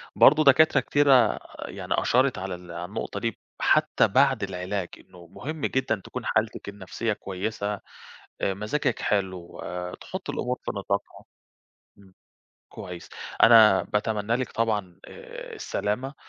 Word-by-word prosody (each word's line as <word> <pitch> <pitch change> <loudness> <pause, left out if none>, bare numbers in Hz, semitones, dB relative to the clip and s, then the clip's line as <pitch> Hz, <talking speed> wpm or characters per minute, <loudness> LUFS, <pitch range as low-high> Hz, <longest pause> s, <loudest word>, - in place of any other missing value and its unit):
برضه 150 +2 +7
دكاترة 155 +3 +6
كتيرة 135 -6 +4 0.3
يعني - - -4
أشارت 130 -2 +2
على 95 0 -4
ال 90 -1 -12
على 85 +1 -5
النقطة 100 - -5
دي، 115 -3 -3 0.2
حتى - - +3
بعد 135 +2 +3
العلاج، 95 0 -3
إنه 85 -1 -16
مهم 145 - -7
جدًا 120 -6 0
تكون - - -6
حالتِك - - -1
النفْسِية 100 +3 -3
كويسة، 100 +2 -4 0.7
آآ، 95 - +1
مزاجِك 105 +9 -1
حلو، 95 -4 -2 0.4
تحطي - - -6
الأمور 125 +1 -2
في - - -1
نطاقها 100 0 -3 0.7
آمم، 95 -2 -19 0.6
كويس. 90 -1 -9 0.3
أنا 110 -4 +8
باتمنى 105 +2 -1
لِك 130 -1 -4
طبعًا، 105 -6 -1
آآ، - - -10
السلامة 125 +7 -3
105 Hz, 130 wpm, -26 LUFS, 95-125 Hz, 0.7 s, أنا